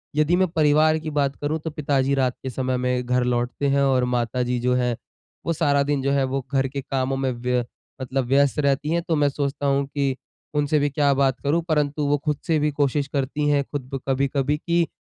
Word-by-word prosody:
यदि 155 Hz, +3 st, +3 dB
मैं 185 Hz, +1 st, +3 dB
परिवार 155 Hz, -1 st, +3 dB
की 155 Hz, -, -5 dB
बात 140 Hz, -2 st, 0 dB
करूँ 150 Hz, +2 st, -1 dB
तो 160 Hz, -, -5 dB
पिताजी 140 Hz, -3 st, 0 dB
रात 130 Hz, -2 st, +1 dB
के 130 Hz, -, -3 dB
समय 130 Hz, 0 st, -1 dB
में 125 Hz, 0 st, -1 dB
घर 125 Hz, 0 st, +1 dB
लौटते 125 Hz, +3 st, -1 dB
हैं 140 Hz, 0 st, +2 dB
और 130 Hz, -2 st, +3 dB
माताजी 125 Hz, +1 st, -1 dB
जो 125 Hz, +1 st, +1 dB
है, 125 Hz, -1 st, +1 dB, 0.5 s
वो 165 Hz, -, +1 dB
सारा 145 Hz, -3 st, +2 dB
दिन 145 Hz, -1 st, 0 dB
जो 140 Hz, +1 st, 0 dB
है 140 Hz, -1 st, +2 dB
वो 130 Hz, 0 st, -2 dB
घर 135 Hz, -1 st, +2 dB
के 140 Hz, +1 st, -5 dB
कामों 135 Hz, -1 st, -2 dB
में 135 Hz, -1 st, 0 dB
व्य 125 Hz, 0 st, -1 dB, 0.4 s
मतलब 130 Hz, 0 st, -1 dB
व्यस्त 140 Hz, +3 st, +2 dB
रहती 140 Hz, +1 st, +1 dB
है 170 Hz, +1 st, +1 dB
तो 165 Hz, -1 st, -1 dB
मैं 145 Hz, -1 st, +3 dB
सोचता 140 Hz, 0 st, -3 dB
हूँ 140 Hz, 0 st, +2 dB
कि 140 Hz, -2 st, -1 dB, 0.4 s
उनसे 150 Hz, +1 st, +2 dB
भी 145 Hz, 0 st, +1 dB
क्या 140 Hz, 0 st, +2 dB
बात 135 Hz, -1 st, +1 dB
करूँ। 155 Hz, +4 st, +2 dB
परंतु 150 Hz, -1 st, +1 dB
वो 145 Hz, +1 st, +2 dB
खुद 150 Hz, -2 st, 0 dB
से 160 Hz, -, +3 dB
भी 150 Hz, 0 st, +1 dB
कोशिश 145 Hz, 0 st, 0 dB
करती 145 Hz, +1 st, -1 dB
हैं, 145 Hz, -1 st, +3 dB
खुद 135 Hz, -2 st, -6 dB
ब 135 Hz, -, -2 dB
कभी-कभी 140 Hz, +2 st, +1 dB
कि 170 Hz, +1 st, +1 dB
140 Hz, 225 wpm, -23 LUFS, 130-150 Hz, 0.5 s, यदि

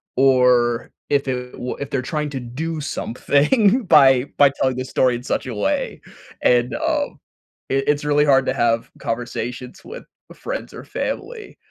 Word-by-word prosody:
or 125 Hz, -2 st, +3 dB, 0.2 s
if 140 Hz, -1 st, +1 dB
it 125 Hz, -1 st, -3 dB
wa 125 Hz, -, -4 dB
if 140 Hz, -, -5 dB
they're 135 Hz, -, 0 dB
trying 150 Hz, +3 st, -3 dB
to 135 Hz, -, -4 dB
do 150 Hz, +6 st, -4 dB
something 195 Hz, -, +1 dB
by 135 Hz, -6 st, +6 dB
by 145 Hz, -1 st, +7 dB
telling 130 Hz, -1 st, +2 dB
the 130 Hz, -, -3 dB
story 130 Hz, -1 st, +2 dB
in 120 Hz, -, -6 dB
such -, -, -2 dB
a 125 Hz, -, -4 dB
way. 105 Hz, -, -2 dB, 0.4 s
And, 120 Hz, 0 st, +3 dB
um, 310 Hz, -2 st, -2 dB, 0.5 s
it 135 Hz, 0 st, 0 dB
it's 145 Hz, 0 st, +1 dB
really 150 Hz, 0 st, +3 dB
hard 135 Hz, -2 st, +4 dB
to -, -, +1 dB
have 115 Hz, -1 st, 0 dB
conversations 120 Hz, +1 st, -5 dB
with 485 Hz, -, -9 dB, 0.3 s
friends -, -, -6 dB
or -, -, -9 dB
family 455 Hz, -3 st, -5 dB
135 Hz, 165 wpm, -21 LUFS, 125-150 Hz, 0.5 s, by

